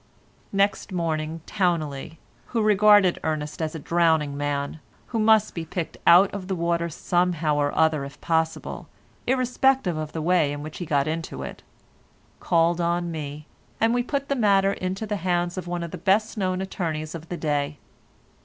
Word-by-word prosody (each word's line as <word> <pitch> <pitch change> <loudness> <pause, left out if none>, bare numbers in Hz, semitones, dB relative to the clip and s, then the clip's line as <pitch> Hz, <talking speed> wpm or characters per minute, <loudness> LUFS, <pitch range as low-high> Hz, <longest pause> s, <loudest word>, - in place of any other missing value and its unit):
Next 200 +1 +1
morning, 165 -2 -2
Towneley—who 165 - -3
regarded 210 -3 +5
Ernest 155 0 -3
as 160 0 -2
a - - -4
drowning 160 -2 +2
man, 145 +1 -2 0.3
who 230 - -1
must 215 -1 +4
be 165 - -4
picked 165 +1 -5
out 180 +3 +7
of 195 -2 -5
the 190 - -1
water 170 0 0
somehow 170 -2 0
or 145 -1 +1
other 160 -3 +3
if 140 +1 -9
possible, 160 0 -1 0.4
irrespective 255 -6 +2
of 155 -1 -4
the 160 - -3
way 170 -4 +3
in 145 0 -6
which 155 0 -8
he 175 - -5
got 140 -1 +1
into 160 - -4
it—called 170 - -3
on 170 0 0
me, 150 -1 -6 0.3
and 225 +1 +3
we 245 - +2
put 280 +3 -2
the 280 - 0
matter 200 -4 +3
into 190 +3 -3
the 210 -1 -2
hands 175 -1 0
of 185 -2 -5
one 175 0 -3
of 170 - -6
the - - -7
best 200 +4 +2
known 185 -3 -1
attorneys 160 -5 -3
of 165 -1 -8
the 175 - -4
day. 145 -2 -1
170 Hz, 170 wpm, -25 LUFS, 155-195 Hz, 0.4 s, out